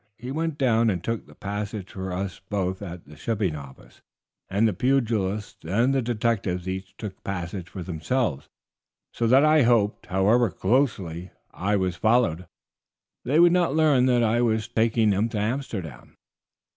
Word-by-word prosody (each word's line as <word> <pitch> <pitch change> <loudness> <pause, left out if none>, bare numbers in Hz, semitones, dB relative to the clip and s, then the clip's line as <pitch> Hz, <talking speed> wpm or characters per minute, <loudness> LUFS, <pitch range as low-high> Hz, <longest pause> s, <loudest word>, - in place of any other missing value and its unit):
He 125 +3 -7
went 160 +1 -2
down 115 -4 +3
and 90 -4 -2
took 115 +2 -3
the - - -16
passage 105 -1 -5
for 95 -1 -5
us 95 0 -4
both 95 -2 -2
at 90 -3 -8
the 75 +2 -14
shipping 100 0 -1
office, 70 -3 -12 0.5
and 100 +4 +2
the 105 - 0
pugilists 110 -4 -1
and 115 +11 +1
the 135 - +2
detectives 105 -6 -1
each 95 +1 -5
took 105 -4 -8
passages 90 -1 -5
for 95 - -7
themselves, 85 - -2 0.6
so 115 - 0
that 135 +5 +6
I 155 0 +5
hoped, 115 -4 +2
however 105 +5 +3
closely 95 - 0 0.2
I 105 +3 -1
was 95 -3 -1
followed, 110 -7 +2 0.8
they 140 +6 +2
would 175 0 +7
not 175 -5 +2
learn 145 -5 +4
that 120 -2 +3
I 115 +2 +2
was 110 -3 +1
taking 110 -1 +2
them 100 +4 +1
to 110 - -4
Amsterdam." 105 - -4
105 Hz, 160 wpm, -25 LUFS, 95-120 Hz, 0.8 s, would